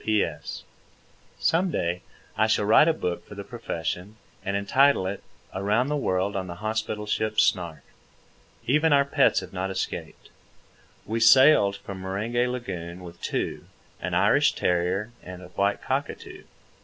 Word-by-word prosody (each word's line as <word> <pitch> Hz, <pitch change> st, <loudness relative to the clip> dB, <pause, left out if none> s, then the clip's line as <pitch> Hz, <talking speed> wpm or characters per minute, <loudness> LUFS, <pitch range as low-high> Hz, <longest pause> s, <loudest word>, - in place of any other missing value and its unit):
P.S. 110 Hz, -1 st, -1 dB, 0.7 s
Some 180 Hz, +3 st, +2 dB
day 90 Hz, -, -2 dB, 0.3 s
I 110 Hz, -, +3 dB
shall 105 Hz, -1 st, +2 dB
write 110 Hz, +9 st, +6 dB
a -, -, +5 dB
book 90 Hz, -, -3 dB
(for 105 Hz, -, -10 dB
the 100 Hz, -, -6 dB
profession), 100 Hz, -3 st, -5 dB, 0.3 s
and 100 Hz, 0 st, -1 dB
entitle 130 Hz, +2 st, +3 dB
it, 95 Hz, +1 st, -4 dB, 0.3 s
"Around 105 Hz, +7 st, +1 dB
the 150 Hz, -, 0 dB
World 100 Hz, -6 st, 0 dB
on 95 Hz, -1 st, -3 dB
the 85 Hz, -, -6 dB
Hospital 110 Hz, +1 st, -3 dB
Ship 110 Hz, +1 st, -1 dB
Snark." 85 Hz, -4 st, +1 dB, 0.8 s
Even 150 Hz, +5 st, +3 dB
our 140 Hz, 0 st, +5 dB
pets 140 Hz, -, +3 dB
have -, -, -11 dB
not 95 Hz, +1 st, -2 dB
escaped. 95 Hz, -1 st, -5 dB, 0.7 s
We 115 Hz, +3 st, -2 dB
sailed 115 Hz, -3 st, +6 dB
from 95 Hz, -2 st, -8 dB
Meringe 100 Hz, +5 st, -4 dB
Lagoon 90 Hz, -8 st, -5 dB
with 85 Hz, -1 st, -11 dB
two, -, -, -3 dB, 0.4 s
an -, -, -2 dB
Irish -, -, +4 dB
terrier 90 Hz, +5 st, 0 dB
and 90 Hz, 0 st, -9 dB
a 90 Hz, -, -11 dB
white 100 Hz, +2 st, 0 dB
cockatoo. -, -, -4 dB
100 Hz, 150 wpm, -26 LUFS, 90-115 Hz, 0.8 s, write